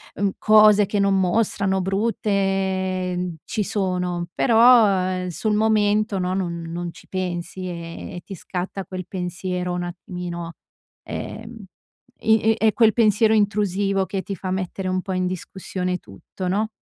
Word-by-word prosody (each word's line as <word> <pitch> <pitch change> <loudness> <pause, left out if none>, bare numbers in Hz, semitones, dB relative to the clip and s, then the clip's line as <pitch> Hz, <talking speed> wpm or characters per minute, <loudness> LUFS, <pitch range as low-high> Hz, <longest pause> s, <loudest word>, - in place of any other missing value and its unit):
mhmm, 200 0 +1
cose 215 -1 +6
che 205 +1 -1
non 195 -1 +3
mostrano, 190 0 +1
brutte, 195 -2 0
mhmm, 180 -1 -3
ci 215 - -2
sono," 180 -3 -1
però, 235 -1 +6 0.2
ehm, 185 0 -2
sul 210 +5 -1
momento, 210 -1 +2
no, 180 0 -1
non 170 -3 -2
non 170 +1 -5
ci - - -16
pensi, 185 0 -4
e 170 +1 -7
e - - -7
ti 195 - -8
scatta 185 +2 -5
quel 185 0 -7
pensiero 180 0 -3
un 175 0 -2
attimino, 175 -1 -6 0.5
ehm, 225 -1 -7 0.5
i 220 0 +3
è 220 - +2
è 215 - +3
quel 225 -2 +4
pensiero 220 -1 +4
intrusivo 200 -2 +1
che 195 0 -3
ti 195 - -5
fa 185 +1 -5
mettere 185 0 -3
un 185 0 0
po' 190 0 -4
in 185 0 0
discussione 185 0 -4
tutto, 185 0 -8
no? 205 +4 +1
190 Hz, 155 wpm, -23 LUFS, 180-210 Hz, 0.5 s, cose